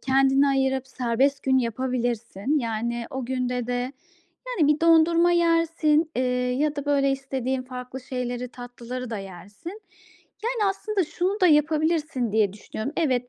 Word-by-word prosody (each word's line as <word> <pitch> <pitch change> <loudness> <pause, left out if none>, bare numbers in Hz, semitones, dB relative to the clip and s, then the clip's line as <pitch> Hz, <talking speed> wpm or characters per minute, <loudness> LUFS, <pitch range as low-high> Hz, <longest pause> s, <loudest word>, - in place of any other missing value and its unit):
kendine 270 +1 +3
ayırıp 265 -1 +1
serbest 260 +3 0
gün 265 -1 +3
yapabilirsin. 240 +1 -1
Yani, 235 0 -2
o 265 -1 -4
günde 250 -1 -2
de, 245 +2 -2 0.5
yani, 360 -13 +1
bir 305 - -9
dondurma 335 +1 +5
yersin, 330 -2 +2
eee, 255 - +1 0.4
ya 300 0 0
da 285 - -3
böyle 275 -1 +3
istediğin 265 -1 -2
farklı 255 0 -8
şeyleri, 250 -1 -4
tatlıları 245 0 -7
da 220 - -3
yersin. 200 - -9 0.6
Yani, 455 -4 +1
aslında 395 -1 -1
şunu 370 +6 -2
da 365 - +6
yapabilirsin 305 -5 +2
diye 210 -3 +2
düşünüyorum. 215 +5 -6
Evet 255 -7 +1
265 Hz, 140 wpm, -25 LUFS, 245-310 Hz, 0.6 s, da